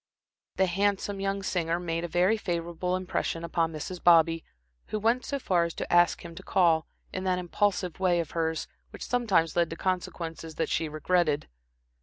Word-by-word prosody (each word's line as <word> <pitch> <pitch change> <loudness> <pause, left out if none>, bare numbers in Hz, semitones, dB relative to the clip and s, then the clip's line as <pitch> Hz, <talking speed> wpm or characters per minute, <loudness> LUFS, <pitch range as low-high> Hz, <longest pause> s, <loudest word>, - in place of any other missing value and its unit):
The 190 - +3
handsome 200 +2 0
young 195 0 -1
singer 170 -2 0
made 165 -1 -2
a - - -2
very 180 +5 +3
favorable 175 -3 -2
impression 180 -2 -2
upon 165 -1 0
Mrs. 165 +3 -6
Bobby, 165 -1 +5 0.4
who - - -2
went 230 +4 +1
so 280 - -2
far 180 -10 +2
as 170 - -5
to - - -4
ask 175 0 +4
him 170 - -8
to 175 - -9
call, 170 -5 +2 0.3
in 185 - -3
that 185 -1 +2
impulsive 180 0 -1
way 180 -2 +3
of 165 -3 -3
hers, 160 -1 -1 0.2
which - - -8
sometimes 205 -10 +1
led 170 -1 +2
to 165 - -5
consequences 165 -3 -3
that 165 - -1
she 160 - 0
regretted. 155 -1 +1
175 Hz, 180 wpm, -28 LUFS, 165-190 Hz, 0.4 s, Bobby